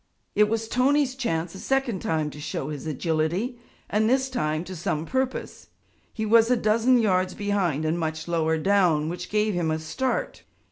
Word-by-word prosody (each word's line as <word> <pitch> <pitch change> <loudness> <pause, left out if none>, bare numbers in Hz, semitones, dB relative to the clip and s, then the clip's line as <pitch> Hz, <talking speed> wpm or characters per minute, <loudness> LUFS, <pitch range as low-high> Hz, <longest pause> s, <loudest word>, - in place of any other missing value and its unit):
It 210 0 +4
was 225 0 -1
Tony's 265 +3 +2
chance 170 -10 -2
a 190 - -9
second 270 -6 0
time 155 -3 -1
to 150 - -10
show 145 -1 -4
his 150 +1 -6
agility 165 - -1 0.3
and 215 +1 +1
this 265 +1 +1
time 155 -9 -1
to 185 +1 -8
some 160 -1 -2
purpose. 260 +5 -3 0.4
He 220 - -3
was 225 +1 +5
a 250 - +4
dozen 230 +3 +3
yards 185 -5 +1
behind 190 -7 0
and 160 +2 0
much 160 0 -3
lower 160 -1 +1
down, 165 -4 +2
which 175 +1 -6
gave 210 0 +1
him 175 -3 0
a 155 - 0
start. 260 - -2
190 Hz, 180 wpm, -25 LUFS, 160-230 Hz, 0.4 s, was